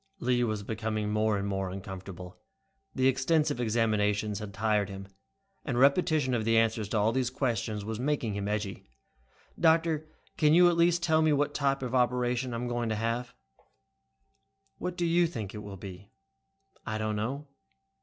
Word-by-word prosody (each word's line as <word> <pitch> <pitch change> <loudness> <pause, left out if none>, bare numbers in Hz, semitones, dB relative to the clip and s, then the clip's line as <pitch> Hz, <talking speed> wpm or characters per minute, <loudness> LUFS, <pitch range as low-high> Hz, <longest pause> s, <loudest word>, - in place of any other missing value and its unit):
Lee 125 -8 +1
was 110 -3 -2
becoming 110 0 -2
more 105 0 +1
and 100 0 -2
more 95 -1 -2
uncomfortable. 95 -1 -8 0.6
The 130 - +1
extensive 145 +2 +2
examinations 105 -2 +1
had 105 -2 -6
tired 105 -1 0
him, 95 0 -8 0.6
and 130 -5 -2
repetition 140 0 +3
of 115 -3 0
the 115 +1 +3
answers 110 -2 +1
to 110 - 0
all 105 +2 +3
these 125 0 0
questions 115 -5 -2
was 110 0 -4
making 130 -5 -1
him 100 0 -3
edgy. 105 - -4 0.7
"Doctor, 160 -2 +3 0.3
can't 150 0 +4
you 175 0 +7
at 175 - +1
least 170 0 +3
tell 160 -2 +3
me 155 -1 +3
what 145 0 +1
type 135 -1 0
operation 125 0 0
I'm 120 +1 -3
going 120 -1 -2
to 110 - 0
have?" 115 +3 -2 1.4
"What 180 0 -4
do 175 - 0
you 170 +1 +3
think 110 - -6
it 105 - -6
will 100 -2 -8
be?" 95 +1 -10 0.7
"I 110 - -3
don't 110 0 -2
know. 130 +8 -3
115 Hz, 165 wpm, -29 LUFS, 105-140 Hz, 1.4 s, you